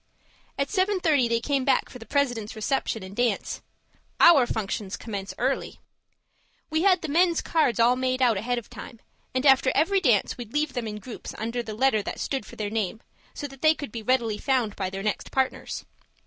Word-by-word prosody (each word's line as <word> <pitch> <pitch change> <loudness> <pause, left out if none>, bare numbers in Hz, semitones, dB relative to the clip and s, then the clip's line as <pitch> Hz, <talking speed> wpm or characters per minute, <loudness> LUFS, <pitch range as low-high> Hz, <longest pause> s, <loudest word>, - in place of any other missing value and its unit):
At 275 - -1
seven 390 0 +1
thirty 295 -8 +3
they 230 0 +1
came 275 +2 0
back 270 - +2
for 250 - -11
the 225 - -12
President's 245 -6 -1
reception 220 -1 -1
and 190 +1 -9
dance. 240 -4 -1 0.6
Our 290 -8 +7
functions 205 -3 -3
commence 200 -4 -5
early! 265 +2 -1 0.9
We 315 0 +1
had 370 -2 +4
the - - -2
men's 340 +3 +3
cards 305 -9 +1
all 240 +2 +5
made 255 0 -1
out 245 -4 +4
ahead 240 +5 -1
of 240 - -5
time, 230 - -10 0.4
and 255 +2 0
after 265 -1 +5
every 380 +6 +3
dance, 240 - +2
we'd 235 -2 -8
leave 295 -1 0
them 240 -2 -3
in 210 -1 -5
groups, 225 +2 -8
under 230 +2 -2
the 220 -2 -7
letter 225 -2 +3
that - - -6
stood 270 -5 -3
for - - -11
their 205 -1 -3
names, 215 0 -2 0.3
so 290 - -5
that 270 -2 -10
they 315 0 +5
could 285 -8 -7
be 230 - -5
readily 230 -2 +1
found 250 -6 0
by 190 -2 -2
their 195 +1 -6
next 210 - -2
partners. 265 -1 -2
245 Hz, 205 wpm, -26 LUFS, 220-280 Hz, 0.9 s, Our